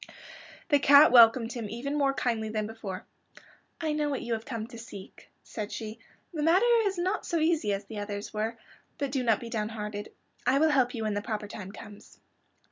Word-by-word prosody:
The 290 -3 +5
cat 285 +1 +7
welcomed 230 -1 +6
him 230 -4 -5
even 265 +6 -4
more 275 -2 +2
kindly 225 -4 -1
than 215 -1 -2
before. 210 -4 -7 0.7
"I 315 -2 -1
know 300 -1 0
what 275 - -3
you 235 -1 -2
have 225 0 -4
come 230 -4 -4
to 235 0 -11
seek," 205 -4 -11
said 210 -1 -6
she. 220 -1 -6 0.3
"This 305 -2 -2
matter 350 +8 +4 0.2
is 390 -2 -1
not 370 +4 -1
so 340 - -1
easy 315 -9 +1
as 200 0 -2
the 210 +1 -7
others 205 0 -5
were. 220 +2 -2 0.4
But 280 -2 -2
do 265 -1 0
not 225 -4 +2
be 235 - -8
downhearted. 210 -1 -4 0.4
I 260 +2 +4
will 315 +2 +4
help 260 -3 +2
you 225 - -3
when 215 -1 -1
the 205 - -1
proper 215 -1 -4
time 195 -2 -8
comes." 205 0 -13
230 Hz, 205 wpm, -28 LUFS, 215-280 Hz, 0.7 s, cat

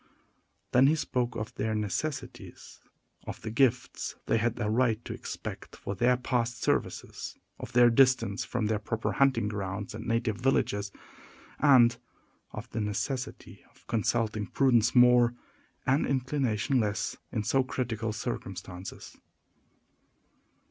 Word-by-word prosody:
Then 130 +2 +6
he 155 - +4
spoke 125 -5 -1
of 105 - -5
their 110 0 -2
necessities; 125 +8 -4 0.5
of - - -7
the 110 - -4
gifts 125 +1 +1
they 115 - +2
had 115 0 -1
a 105 - 0
right 115 0 +2
to - - -4
expect - - -7
for 100 - -5
their 120 +5 +3
past 125 -1 -1
services; - - -2 0.2
of - - -8
their 120 0 +6
distance 125 -5 +3
from 120 -3 -2
their 105 0 0
proper 115 +2 -2
hunting 130 -6 +2
grounds 100 +1 -4
and 110 +2 -7
native 115 -2 0
villages; 105 -5 0 0.7
and 125 -5 +6 0.5
of 105 +3 -8
the 110 - -2
necessity 105 +6 -4
of - - -26
consulting 110 -2 0
prudence 120 -1 +3
more, 125 -1 +6 0.5
and 135 +3 +2
inclination 130 -2 0
less, 105 -3 -1
in 105 - -1
so 135 +5 +2
critical 115 -4 -3
circumstances. 95 -5 -6
115 Hz, 130 wpm, -29 LUFS, 105-125 Hz, 0.7 s, Then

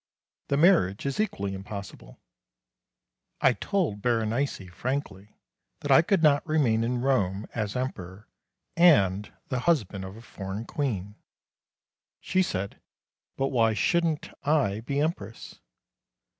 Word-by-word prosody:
The 140 - +1
marriage 150 - +4
is 140 +5 -2
equally 100 - -1
impossible. 95 - -8 1.2
I - - +4
told 170 - -1
Berenice 115 -2 0
frankly 105 -5 -4 0.5
that 145 - -2
I 135 - +8
could 175 0 +1
not 145 -2 +5
remain 130 -8 +2
in 120 +1 -1
Rome 105 -7 +1
as 105 -3 -3
Emperor 100 -6 -5 0.5
and 105 - +4 0.2
the 130 - -1
husband 105 - +1
of 95 +3 -8
a 115 - -12
foreign 100 0 -6
Queen. 105 -9 -3 1.0
She 185 - +1
said, 100 - -3 0.6
"But 135 0 0
why 115 -4 +2
shouldn't 170 - +1
I 140 -9 +2
be 140 +5 -2
Empress?" 155 -6 -4
115 Hz, 120 wpm, -27 LUFS, 100-145 Hz, 1.2 s, I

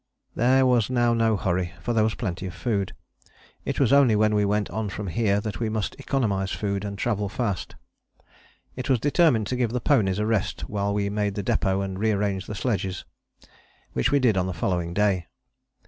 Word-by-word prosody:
There 130 +3 +3
was 125 -4 +3
now 120 -2 +2
no 115 -2 +2
hurry, 90 -1 -1
for 120 - -2
there 110 -2 +3
was 110 -2 0
plenty 95 -4 -4
of 90 - -8
food. 100 -1 -1 0.7
It - - -2
was 135 -2 +3
only 135 -6 +5
when 110 0 +3
we 105 -1 +2
went 105 0 +1
on 110 +2 -2
from 105 +1 -5
here 100 +2 +1
that 105 -4 -5
we 115 -2 -1
must 110 -1 -2
economize 105 -9 0
food 100 -1 -2
and 100 -1 -5
travel 105 -2 -1
fast. 105 -5 -3 1.0
It 130 0 -5
was 130 -3 +3
determined 145 -5 +3
to 125 - -2
give 125 -2 +1
the 125 - 0
ponies 95 -5 +2
a 105 - 0
rest 110 -3 -1
while 100 -1 -1
we 100 0 -1
made 105 -1 -1
the 100 - -3
depôt 95 +1 +1
and 95 -1 -5
rearranged 100 -3 0
sledges, 95 -6 -2 0.9
which 65 - +1
we 145 - +4
did 120 -7 +3
on 90 0 +1
the 90 - -4
following 85 0 -1
day. 100 -4 +1
105 Hz, 195 wpm, -25 LUFS, 95-115 Hz, 1.0 s, only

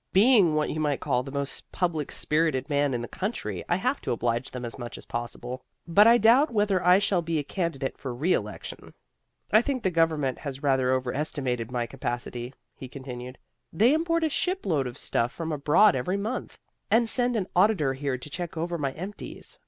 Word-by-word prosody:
Being 200 -6 +5
what 155 0 +1
you 155 - -3
might 145 -3 0
call 125 -4 0
the 135 +1 -8
most 140 -1 -4
public 165 -5 -1
spirited 150 -3 0
man 145 -2 +2
in 120 - -3
the - - -5
country, 115 - -4
I 175 - +3
have 250 +9 -1
to - - -3
oblige 120 +1 -1
them 125 -1 -6
as 120 +3 -7
much 120 -1 -6
as - - -10
possible. 120 +2 -5 0.2
But 200 +6 +6
I 235 +1 +7
doubt 240 +7 +5
whether 205 -4 +1
I 180 +1 +6
shall 195 -3 +1
be 165 -1 -2
a 150 - 0
candidate 155 -5 -3
for 130 - -4
reelection. 120 - -3 0.6
"I 215 - +7
think 260 -1 -2
the 190 - +1
government 160 -6 +1
has 140 -2 -6
rather 130 -2 +2
overestimated 130 -2 -1
my 125 -1 -1
capacity," 120 -1 -5 0.2
he 130 - -9
continued. 125 -1 -8 0.3
"They 225 - +4
import 330 +1 +1
a 320 - +2
shipload 235 - 0
of 120 - -8
stuff 115 +1 0
from 165 +1 -5
abroad 150 +7 +4
every 180 +10 -1
month, 220 +6 -4 0.3
and 230 +1 +4
send 245 +1 +1
an 205 -4 0
auditor 180 -8 +3
here 135 -1 -2
to 125 - -10
check 170 +2 -6
over 170 +1 -2
my 135 -2 -1
empties. 190 +7 -8
150 Hz, 195 wpm, -27 LUFS, 130-195 Hz, 0.6 s, I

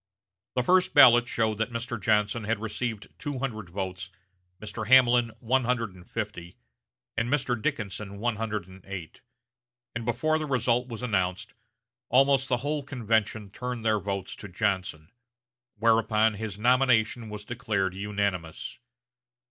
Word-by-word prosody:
The 125 - +2
first 185 +5 +3
ballot 120 -4 +8
showed 110 -3 0
that 115 - 0
Mr. 115 -1 -4
Johnson 105 +1 +1
had 115 +1 0
received 110 0 -4
two 145 -3 -4
hundred 110 -8 -4
votes, 90 -1 -5 0.5
Mr. 105 0 -6
Hamlin 120 -2 +6
one 130 +2 +1
hundred 115 -5 0
and 90 0 -16
fifty, 105 -6 -5 0.6
and 115 +1 0
Mr. 125 -4 0
Dickinson 100 -2 -3
one 115 +1 -1
hundred 105 -4 -3
and 95 0 -14
eight; 95 -5 -7 0.7
and 115 - -4
before 155 +7 +1
the 155 - -3
result 125 -2 +1
was 115 -1 -7
announced 95 -6 -1 0.6
almost 135 +1 +4
the 125 - +2
whole 150 0 0
convention 110 -6 -1
turned 125 0 -5
their 110 -1 +3
votes 100 -1 -4
to - - -8
Johnson; 90 -3 -2 0.6
whereupon 110 0 +3
his 105 -1 -5
nomination 120 -1 +2
was 105 -1 -7
declared 105 -6 -1
unanimous. 100 -4 -3
110 Hz, 140 wpm, -27 LUFS, 100-125 Hz, 0.7 s, ballot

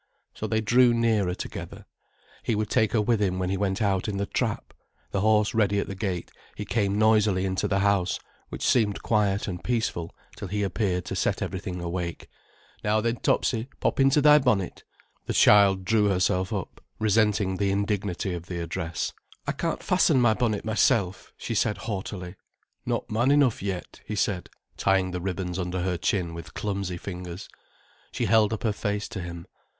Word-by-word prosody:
So - - -4
they 110 0 +1
drew 120 +2 +4
nearer 110 -6 +1
together. - - -7 0.6
He 115 - -1
would 105 0 -2
take 110 - +2
her 110 - +3
with 115 -1 +1
him 95 -2 +1
when 90 0 -1
he - - +1
went 100 +1 0
out 95 -1 +1
in 105 -2 -2
the 100 - -1
trap. - - -2 0.4
The 95 - 0
horse 105 0 +3
ready 105 -2 +2
at 100 - 0
the - - -6
gate, 95 -3 -3 0.2
he - - -5
came 100 -3 0
noisily 105 -3 +3
into 95 0 -1
the 95 -1 +1
house, 100 -2 +1 0.3
which - - -4
seemed 105 -5 +2
quiet 105 -2 +1
and 90 -3 -5
peaceful 110 -8 -2 0.2
till 100 - -6
he 105 +2 -1
appeared 95 -2 -1
to - - -4
set - - 0
everything 95 -1 -4
awake. 85 0 -4 0.6
"Now 105 +1 +2
then, 115 +2 0
Topsy, 115 0 0
pop - - 0
into 135 +2 +5
thy 150 +1 +7
bonnet." 110 -9 0 0.4
The - - -1
child 100 -2 +6
drew 110 +1 +3
herself 95 -1 +1
up, - - -5
resenting 105 -3 +2
the 100 0 +1
indignity 100 -1 -1
of 85 0 -6
the 90 - -4
address. 85 -1 -3 0.3
"I - - 0
can't - - -3
fasten 130 - +3
my 120 -3 +4
bonnet 110 -3 -1
myself," 100 -3 +1
she - - -4
said 105 - +1
haughtily. 95 -3 -5 0.5
"Not - - -2
man 120 +5 +2
enough 140 -4 +3
yet," 95 -2 -5
he 105 - -5
said, 100 -3 -1 0.3
tying 95 -1 +2
the 90 0 -4
ribbons 90 -1 -3
under 90 0 -2
her 90 -1 0
chin 90 -3 0
with 85 -2 -9
clumsy 100 -3 -3
fingers. 90 0 -7 0.6
She - - -1
held 110 -2 +4
up 110 - -3
her 110 -3 +1
face 105 0 -2
to 95 - -5
him. 85 -1 -7
100 Hz, 185 wpm, -26 LUFS, 90-110 Hz, 0.6 s, thy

